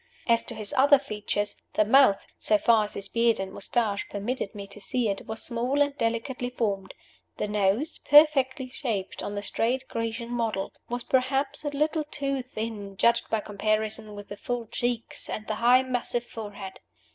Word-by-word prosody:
As 235 -1 +4
to 235 - -4
his 215 -2 -2
other 285 +2 +6
features, 210 -5 -3 0.2
the 215 - +4
mouth, 230 -3 +5
so 215 - +3
far 220 0 +4
as 205 - -6
his 200 - -4
beard 230 0 +2
and 190 0 -4
mustache 205 0 -1
permitted 210 +1 -3
me 200 -1 -6
to 200 +1 -11
see 235 +2 0
it, 195 - -4
was 220 0 -2
small 245 +4 0
and 285 -1 +2
delicately 240 +1 -2
formed; 200 -6 -2 0.4
the - - -1
nose 210 - 0
perfectly 285 -3 +5
shaped 225 -7 -3
on 205 - -4
the 205 - -3
straight 245 +5 0
Grecian 230 +1 -3
model 225 -5 -1 0.2
was 245 0 -2
perhaps 270 +3 0
a 295 - -1
little 305 +2 0
too 275 -2 -2
thin, 215 -5 -6
judged 235 +3 +3
by 220 -1 +1
comparison 215 +1 -1
with 205 0 -9
the 205 - -7
full 245 +1 -3
cheeks 240 +1 -3
and 215 - -4
the 215 - -2
high 250 +2 +6
massive 245 -1 -1
forehead. 205 -4 -8
230 Hz, 180 wpm, -27 LUFS, 210-255 Hz, 0.4 s, other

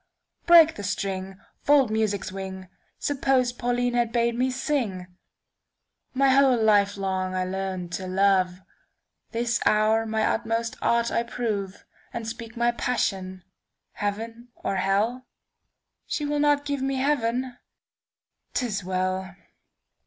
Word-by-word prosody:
Break 330 -2 +7
the 205 - -6
string; 190 0 -3 0.2
fold 280 -5 +4
music's 215 -3 -1
wing:Suppose 220 +7 -2
Pauline 245 0 -1
had 240 -1 +1
bade 235 0 +1
me 250 +2 +1
sing! 250 -8 -2 1.1
My 270 +1 +4
whole 265 -1 +5
life 205 -2 +3
long 190 -1 -2
I 185 - 0
learn'd 185 -1 -4
to 185 +1 -4
love. 185 -1 +2 0.7
This 235 0 0
hour 220 +1 +3
my 220 0 0
utmost 230 0 -1
art 235 0 +2
I - - +1
proveAnd 220 -1 -5
speak 230 +1 -7
my 235 0 +3
passion—heaven 215 +1 -4
or 195 - -3
hell? 205 +7 0 0.8
She 295 - -2
will 295 0 -1
not 290 -1 +3
give 285 -2 -2
me 270 0 -1
heaven? 255 -2 0 1.0
'T 255 - +1
is 210 -4 -3
well! 185 +1 -2
225 Hz, 120 wpm, -25 LUFS, 195-245 Hz, 1.1 s, Break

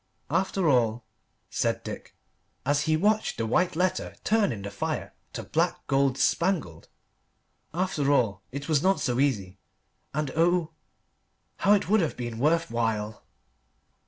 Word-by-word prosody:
"After 190 -1 +1
all," 120 -4 +2 0.5
said - - 0
Dick, - - -8 0.5
as 145 +2 +2
he 155 -1 +2
watched 210 +5 +1
the 115 - -1
white 175 +10 +1
letter 180 +2 -1
turn 215 -2 +2
in 100 -4 -6
the 100 - -5
fire 100 - -3 0.2
to - - -5
black, - - -1
gold 135 -1 +2
spangled, 165 - 0 0.8
"after 155 -4 0
all, 110 -9 +2
it 140 +2 -6
was 155 -3 +2
not 190 +2 +3
so 125 -2 0
easy. 100 -9 0 0.5
And 150 -2 -2
oh, 170 0 +2 0.9
how 200 - +4
it 205 - +2
would 215 +2 +4
have 155 -8 -2
been 120 -2 -5
worth 165 +3 +2
while!" 110 -2 -2
145 Hz, 145 wpm, -27 LUFS, 115-175 Hz, 0.9 s, how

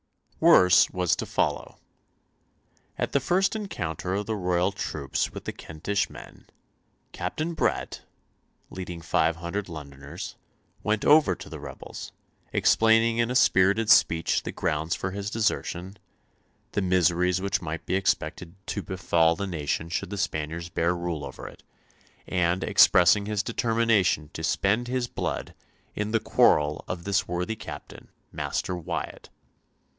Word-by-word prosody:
Worse 90 0 +6
was 90 -2 +1
to - - -4
follow. - - -1 1.2
At - - -2
the - - +2
first 190 +4 +1
encounter 90 - -3
of 105 +1 -2
the 110 - -2
royal 90 -1 +1
troops 75 -8 -3
with - - -9
the - - -2
Kentish 100 +6 -3
men - - -13 0.6
Captain 160 +2 -3
Bret, - - -1 0.7
leading 90 -2 -6
five 80 0 +2
hundred 90 +4 -4
Londoners, 70 -3 -8 0.4
went 110 0 0
over 150 +1 +5
to 95 +1 -11
the 80 - -8
rebels, 70 -2 -9 0.4
explaining 115 +1 +3
in 115 0 +2
a 125 - -2
spirited 100 -1 +4
speech 80 0 +4
the - - -5
grounds 75 +2 -1
for 95 - -4
his 100 +1 -4
desertion, 100 -3 -2 0.7
the 105 - -1
miseries 90 0 +2
which 100 0 -1
might 80 -1 -5
be - - -2
expected 90 -2 -1
to 100 - -3
befall 85 -3 +1
the 100 - -3
nation 80 -3 -2
should 85 - -3
the 100 - -5
Spaniards 85 -2 -3
bear 85 +1 0
rule 85 -3 -3
over - - -8
it, - - -13 0.6
and 90 0 0
expressing 100 +3 +5
his 105 -1 -1
determination 115 -9 +1
to 80 - -6
spend 105 +8 +1
his 125 -1 -1
blood - - -4 0.4
"in 105 0 -3
the 115 +1 +2
quarrel 75 -7 +3
of 90 -2 -5
this 100 +1 0
worthy 90 +5 -2
captain, - - -10 0.2
Master 90 - -3
Wyatt." 90 - -5
90 Hz, 140 wpm, -26 LUFS, 85-105 Hz, 1.2 s, Worse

